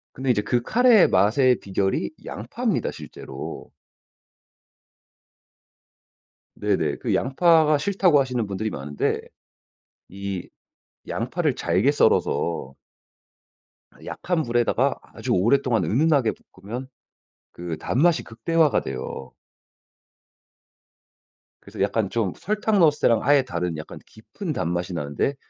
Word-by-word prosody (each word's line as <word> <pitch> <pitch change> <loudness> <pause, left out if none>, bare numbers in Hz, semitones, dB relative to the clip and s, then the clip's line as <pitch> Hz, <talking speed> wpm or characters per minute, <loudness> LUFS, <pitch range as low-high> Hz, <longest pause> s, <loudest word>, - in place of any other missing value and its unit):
근데 130 -1 0
이제 105 - +1
그 120 +3 0
카레의 235 - +5
맛의 120 +6 +3
비결이 95 -9 -1
양파입니다 - - -2
실제로. - - -9 2.9
네네. - - 0
그 - - -1
양파가 155 +2 +3
싫다고 180 -1 +3
하시는 125 -5 -1
분들이 100 +2 -3
많은데 75 -3 -2 0.9
이 100 -1 -6 0.6
양파를 - - -1
잘게 105 +10 +1
썰어서 85 - +1 1.3
약한 175 -3 -2
불에다가 120 -1 +1 0.2
아주 - - -4
오랫동안 120 +4 +2
은은하게 140 -1 +2 0.2
볶으면 120 +6 -7 0.6
그 85 -2 -6
단맛이 160 - +2
극대화가 155 +7 +1
돼요. 65 0 -6 2.3
그래서 - - -9
약간 110 -4 0
좀 110 -5 -1
설탕 210 +1 0
넣었을 155 -4 +4
때랑 115 -2 +3
아예 145 -1 +5
다른 85 -7 -3
약간 75 - -9
깊은 155 - -7
단맛이 90 - -2
나는데 75 - -2
120 Hz, 245 characters per minute, -24 LUFS, 95-150 Hz, 2.9 s, 카레의